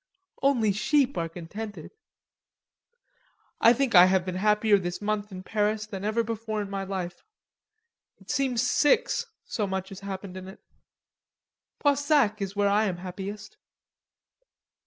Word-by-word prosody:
"Only 245 -6 +3
sheep 265 +6 +2
are 165 -2 -2
contented." 205 +6 -8 1.7
"I 230 - +7
think 250 0 +1
I 180 -1 +9
have 185 -1 +2
been 185 - -3
happier 210 +2 +3
this 175 -1 -4
month 210 0 -2
in 185 -1 -8
Paris 215 +1 0
than 200 -2 -7
ever 220 +3 +1
before 220 -1 -4
in 200 -1 -4
my 195 0 -3
life. 185 -2 -5 1.0
It - - -8
seems 260 -4 +1
six, 480 - +2 0.2
so 210 -3 -2
much 190 0 -3
has 195 - -9
happened 195 -1 -7
in 185 0 -8
it." 190 - -11 1.2
"Poissac 285 -7 +2
is 195 0 -4
where 205 0 +2
I 205 +2 +3
am 185 -4 -2
happiest." 195 +3 -7
205 Hz, 140 wpm, -27 LUFS, 190-225 Hz, 1.7 s, I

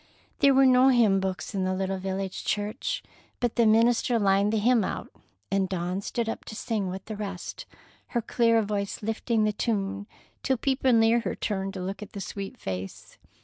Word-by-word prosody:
There 275 -1 +5
were 270 0 +6
no 255 0 +6
hymn 230 -7 +4
books 190 -1 -3
in 195 -2 -1
the 185 0 0
little 190 0 -2
village 190 0 -4
church, 225 - -2 0.4
but 240 -2 -1
the 235 -2 +4
minister 230 +2 +3
lined 200 0 +3
the 220 - +1
hymn 230 +1 +3
out, - - -4 0.4
and 195 -1 +1
Dawn 180 +1 -2
stood 230 +3 -2
up 225 - -4
to 215 - -8
sing 210 -4 -2
with 190 +1 -6
the 215 - -6
rest, 195 -4 -6 0.4
her 240 - -1
clear 230 -1 +3
voice 200 0 -3
lifting 225 +1 0
the 210 0 +1
tune 200 -2 -2 0.3
till 265 -1 +1
people 265 +1 +1
near 225 0 +5
her - - -3
turned 195 -1 -3
to 185 - -4
look 195 +3 -5
at 210 - -9
the 200 - -6
sweet 195 +1 -6
face. 95 0 -7
210 Hz, 190 wpm, -27 LUFS, 195-235 Hz, 0.4 s, were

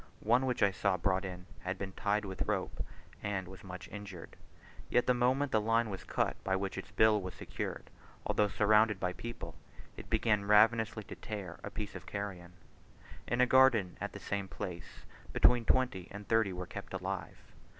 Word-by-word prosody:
One 120 +4 +3
which 125 -3 +1
I 100 - +5
saw 95 0 +1
brought 95 +2 +1
in, 90 -1 -7
had 95 0 -3
been 95 0 -4
tied 105 +2 0
with 95 -1 -3
rope, - - -1 0.4
and 95 -3 -2
was 95 0 -11
much 90 -1 -8
injured; 100 -5 -8 0.5
yet, 125 - +3
the 125 - +4
moment 130 +3 +2
the 110 - +3
line 115 0 +2
was 95 - -6
cut - - -1
by 95 - +1
which 95 0 -2
its - - -6
bill 110 -1 +4
was 95 -1 -6
secured, - - -5 0.3
although 105 - +2
surrounded 105 0 +4
by 90 -1 -1
people, 120 +5 -7 0.4
it - - -10
began 105 -3 +2
ravenously 110 +1 +4
to - - -9
tear 100 -5 -6
a - - -4
piece 105 -2 -5
of - - -9
carrion. 95 -4 -5 0.7
In 120 +1 +1
a - - +7
garden 125 -8 +5
at - - -3
the - - -7
same 100 -1 -3
place, 90 -2 -7 0.3
between 120 -2 +5
twenty 125 -10 +2
and 105 0 -9
thirty 110 -3 +3
were 90 0 -4
kept 100 +1 -7
alive. 95 -2 -4
100 Hz, 185 wpm, -33 LUFS, 95-110 Hz, 0.7 s, a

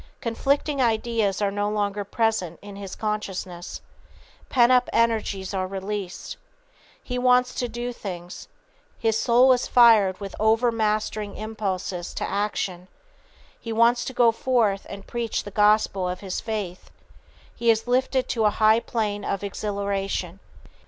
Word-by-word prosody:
Conflicting 275 +4 0
ideas 220 -4 +1
are 200 - +1
no 205 +1 -1
longer 205 -1 -1
present 205 -5 -1
in 205 -1 -9
his 195 -2 -7
consciousness. 190 -5 -4 0.7
Pent 245 -1 +4
up 250 -1 +4
energies 215 -4 0
are 185 -1 -1
released. 195 0 -5 0.7
He 250 -1 -3
wants 250 0 +3
to 245 - -2
do 240 +1 -4
things. 180 -5 -8 0.5
His 225 -1 +1
soul 245 +3 +5
is 250 - -1
fired 220 -6 +5
with 200 -2 -7
overmastering 215 -2 +1
impulses 195 -5 -4
to - - -2
action. 190 -3 -2 0.7
He 230 - -6
wants 235 +2 +3
to 260 - -5
go 240 -2 +5
forth 225 -5 0
and 200 -1 -8
preach 235 -2 -3
the 205 - -8
gospel 210 -2 +3
of 180 - -5
his 190 -2 -3
faith. 205 -5 -5 0.7
He 235 - 0
is 225 0 +3
lifted 255 +1 +1
to 225 -2 +1
a - - +6
high 215 +2 +4
plane 210 -4 -2
of 195 - -2
exhilaration. 200 -2 -3
215 Hz, 140 wpm, -24 LUFS, 195-235 Hz, 0.7 s, a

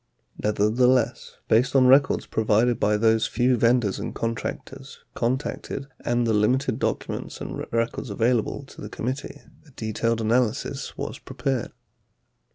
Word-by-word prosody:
43 105 -1 +1
Nevertheless, 125 +2 +2
based 125 +5 +3
on 130 -1 +6
records 135 +3 +4
provided 110 +2 +2
by 105 0 +2
those 110 0 +3
few 125 +2 +2
vendors 115 -3 +2
and - - -5
contractors 115 -1 -5 0.2
contacted 130 +2 -2 0.2
and 120 0 +1
the 115 - +1
limited 125 +4 +1
documents - - -3
and - - -5
records 115 +2 -1
available 115 +5 0
to 135 - -13
the 105 - -7
committee, 130 +6 -5 0.2
a 160 - -20
detailed 115 -2 -2
analysis 115 0 -1
was - - -5
prepared. 135 -4 -3
115 Hz, 135 wpm, -25 LUFS, 110-125 Hz, 0.2 s, on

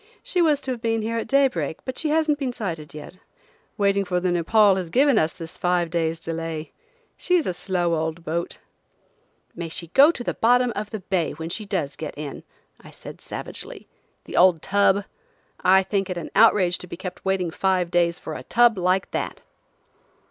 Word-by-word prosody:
"She 360 - 0
was 305 -4 +3
to 265 - -4
have 240 -3 -5
been 225 -2 0
here 230 +1 -1
at - - -5
daybreak, 260 - +1
but 260 - -4
she 310 - -2
hasn't 305 -1 +2
been 265 -3 -1
sighted 170 -11 -5
yet. 155 +4 -10 0.6
Waiting 200 -1 +2
for 180 -1 -1
the 180 0 0
Nepaul 195 +4 +4
has 180 -3 -4
given 265 - +4
us 155 +1 +1
this 165 -2 -10
five 175 -2 0
days' 165 -1 -1
delay. 165 -1 -5 0.5
She's 360 -3 +1
a 185 - -1
slow 175 -1 -1
old 160 +1 -2
boat." 170 +2 -3 1.0
"May 170 -1 -6
she 165 +1 -5
go 275 - +7
to 270 -7 -3
the - - -2
bottom 245 +1 +3
of 210 0 -4
the 215 -2 -6
bay 185 -3 -1
when 160 +2 -6
she 215 +3 -4
does 140 -8 -2
get 150 0 -7
in!" 150 -2 -6 0.4
I - - -12
said - - -11
savagely. - - -8 0.4
"The - - -8
old 180 -3 +5
tub! 200 0 +2 0.5
I 190 +1 +5
think 195 0 -1
it 180 - -3
an 170 - -6
outrage 190 -6 +4
to 180 - -9
be - - -8
kept 185 0 -7
waiting 190 -3 0
five 185 -1 0
days 170 -1 +2
for 160 - -7
a 130 - -6
tub 230 - +3
like 185 +2 +1
that." - - -4
185 Hz, 195 wpm, -23 LUFS, 165-225 Hz, 1.0 s, go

